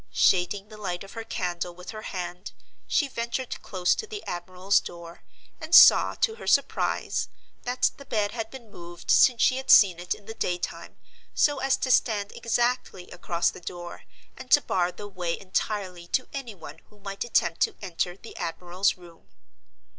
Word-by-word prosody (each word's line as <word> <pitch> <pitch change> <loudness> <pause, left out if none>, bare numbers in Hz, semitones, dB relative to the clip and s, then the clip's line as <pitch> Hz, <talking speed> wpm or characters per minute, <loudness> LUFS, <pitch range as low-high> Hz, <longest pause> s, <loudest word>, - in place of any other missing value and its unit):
Shading 195 +3 +2
the 215 - -11
light 180 -2 -3
of 195 - -12
her 225 - -6
candle 175 -4 -3
with 180 +1 -9
her 215 -1 -8
hand, 180 -2 -6 0.3
she 290 - +2
ventured 235 0 -4
close 180 -2 +1
to 440 - -5
the 420 -1 -7
admiral's 185 +2 0
door, 170 -1 -10 0.4
and 320 +1 +2
saw, - - +8
to 450 -3 +2
her - - -10
surprise, - - +1 0.4
that 250 +1 +1
the 280 - -12
bed 210 -5 0
had 225 -2 -4
been 240 -5 -12
moved 175 -1 -6
since 245 -3 +6
she 255 - +4
had 265 - -6
seen 185 -4 +7
it 175 0 -2
in 205 - -18
the 225 - -7
day 180 -5 -1
time, 175 - -7 0.4
so 290 -2 +3
as 270 0 +2
to 255 - -1
stand 210 -4 +2
exactly 240 -5 -1
across 175 -1 0
the - - -12
door, 175 0 -8 0.3
and 255 0 -11
to 290 - +6
bar 180 -7 0
the 205 +3 -9
way 180 -4 -3
entirely 185 -2 -3
to 255 - 0
any 260 -6 -6
one 175 - -11
who 210 - -22
might 195 0 -4
attempt 170 -8 +1
to - - +2
enter 175 +1 -3
the 225 - -12
admiral's 175 +3 -1
room. 170 -2 -17
195 Hz, 185 wpm, -26 LUFS, 175-235 Hz, 0.4 s, saw